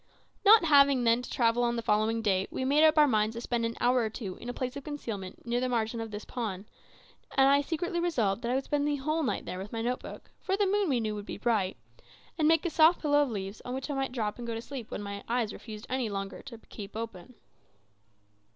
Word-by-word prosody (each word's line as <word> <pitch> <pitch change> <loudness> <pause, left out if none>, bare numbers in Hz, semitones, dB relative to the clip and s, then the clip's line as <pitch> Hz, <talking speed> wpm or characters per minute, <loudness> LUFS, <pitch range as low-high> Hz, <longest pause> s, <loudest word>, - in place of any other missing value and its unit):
Not 420 -3 +7
having, 280 -4 +5
then, 230 +1 +3
to 250 - -9
travel 235 0 +2
on 240 0 +1
the 230 - -3
following 220 +1 +1
day, 190 -3 +1
we 260 - -3
made 290 +3 +4
up 315 0 +5
our 300 - +8
minds 215 -2 +1
to 235 - -5
spend 235 -1 -1
an 230 - -6
hour 250 +1 +3
or 225 -2 0
two 210 -4 -6
in 240 - -8
a - - 0
place 255 +1 -4
of 280 - -6
concealment 225 -12 -6
near 240 +1 0
the 255 0 -1
margin 230 -1 -1
of 225 - -5
this 210 0 -7
pond; 210 -6 -4 0.7
and 270 0 +6
I 280 +1 +5
secretly 345 +4 -2
resolved 235 - 0
that 235 - -3
I 250 - +1
would 270 - 0
spend 290 +1 0
the 295 - +1
whole 305 +4 -1
night 225 -10 -2
there 185 - -5
with 195 +2 -7
my 225 -1 -3
note 250 +2 -1
book - - -11
(for 385 0 -1
the 410 - +3
moon, 400 -1 +1
we 255 -4 +2
knew, 215 -2 -2
would 205 0 -7
be - - -5
bright), 210 -6 0 0.6
and 310 -2 +2
make 325 +2 +3
a 345 - 0
soft 320 +3 +5
pillow 290 -1 +4
of 285 - +1
leaves 200 -2 -5
on 250 - -4
which 265 +3 -4
I - - -1
might 270 -1 -2
drop 220 -3 -3
and 240 - -6
go 230 - -3
to 225 - -4
sleep 260 -4 -7
when 205 - -5
my 200 0 -6
eyes 230 -3 0
refused 215 0 -9
any 255 -3 -1
longer 195 -1 -5
to 250 -4 -10
keep 210 -2 -10
open. 225 +1 -7
240 Hz, 260 wpm, -29 LUFS, 220-280 Hz, 0.7 s, our